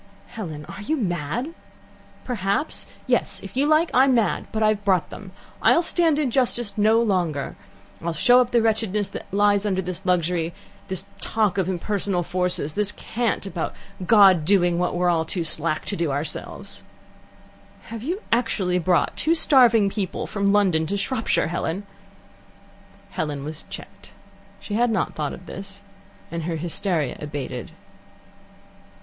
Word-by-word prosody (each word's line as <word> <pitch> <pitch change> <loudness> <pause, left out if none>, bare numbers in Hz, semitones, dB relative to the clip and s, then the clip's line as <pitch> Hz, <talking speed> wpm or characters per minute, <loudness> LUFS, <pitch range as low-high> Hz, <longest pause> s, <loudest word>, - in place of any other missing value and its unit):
"Helen, 160 -9 -7
are 205 - -9
you 310 +10 -1
mad?" 185 - -2 0.7
"Perhaps. 205 +3 -1 0.2
Yes. - - +1
If - - -9
you 275 +3 +2
like, 310 +2 +3
I'm 260 0 +5
mad. 225 -3 +1
But 220 0 0
I've 215 -1 +2
brought 190 -4 +1
them. 195 -3 -9 0.3
I'll 340 - +5
stand 330 -3 +2
injustice 245 -6 0
no 220 +2 +4
longer. 180 -10 0 0.5
I'll 170 - -2
show 245 +11 +5
up 245 - 0
the 235 -2 +2
wretchedness 215 -2 0
that - - -9
lies 205 0 +3
under 195 -3 0
this 185 0 -3
luxury, 175 -2 0 0.3
this 190 0 -2
talk 210 -3 +1
of 185 -1 0
impersonal 190 0 0
forces, 180 -4 -1
this 205 +1 0
cant 230 -3 -2
about 185 -4 -4 0.3
God 195 -4 +6
doing 175 -1 +3
what 180 0 0
we're 175 -2 +2
too 170 +2 -3
slack 155 -1 -1
to 205 - -2
do 170 -4 -1
ourselves." 145 +3 -2 1.0
"Have 230 -1 -8
you 355 - -3
actually 200 -6 +1
brought 180 0 +1
two 325 +2 +2
starving 240 -9 +5
people 195 -2 -3
from 200 -1 -1
London 185 -6 +3
to 200 - -1
Shropshire, 225 -3 0
Helen?" 175 +3 -3 1.3
Helen 150 -6 -3
was 155 +1 -6
checked. - - -10 0.5
She 205 - -7
had 240 +3 +2
not 220 - 0
thought 150 -2 -2
of 180 - -10
this, 195 +2 -7 0.5
and 165 -1 -4
her 170 -1 -2
hysteria 165 -2 -1
abated. 140 -4 -5
195 Hz, 150 wpm, -23 LUFS, 170-225 Hz, 1.3 s, God